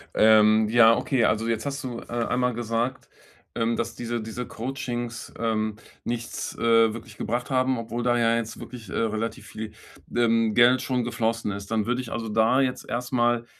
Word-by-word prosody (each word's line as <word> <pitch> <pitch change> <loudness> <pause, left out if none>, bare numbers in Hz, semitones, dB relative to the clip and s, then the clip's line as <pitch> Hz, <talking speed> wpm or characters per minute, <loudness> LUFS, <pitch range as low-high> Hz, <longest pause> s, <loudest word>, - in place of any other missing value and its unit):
Ähm, 110 0 +6
ja, 115 0 +6
okay. 130 -6 +1
Also, 110 +1 +1
jetzt 115 +2 -1
hast 140 0 -3
du, 120 -2 -5
äh, - - -10
einmal 125 +1 0
gesagt, 120 +2 -2 0.5
ähm, 115 0 +1
dass 115 0 -3
diese 120 -1 -3
diese 115 +3 -5
Coachings, 120 -1 -5
ähm, 110 -2 0 0.3
nichts, 120 0 -4
äh, 115 -1 +4
wirklich 115 -2 -10
gebracht 120 +3 -2
haben, 130 -1 +1
obwohl 115 +1 -4
da 120 -1 +2
ja 115 0 +3
jetzt 115 -1 -4
wirklich, 115 -5 -10
äh, - - -7
relativ 115 0 -2
viel, 110 -1 -7 0.4
ähm, 115 -2 +3
Geld 125 +2 +5
schon 125 -2 -1
geflossen 115 -2 -1
ist. 100 +2 -7
Dann 110 -2 +1
würde 125 +2 0
ich 120 - -9
also 115 -2 -3
da 110 +5 +3
jetzt 130 -1 -2
erstmal 120 -1 0
115 Hz, 180 wpm, -25 LUFS, 110-120 Hz, 0.5 s, Ähm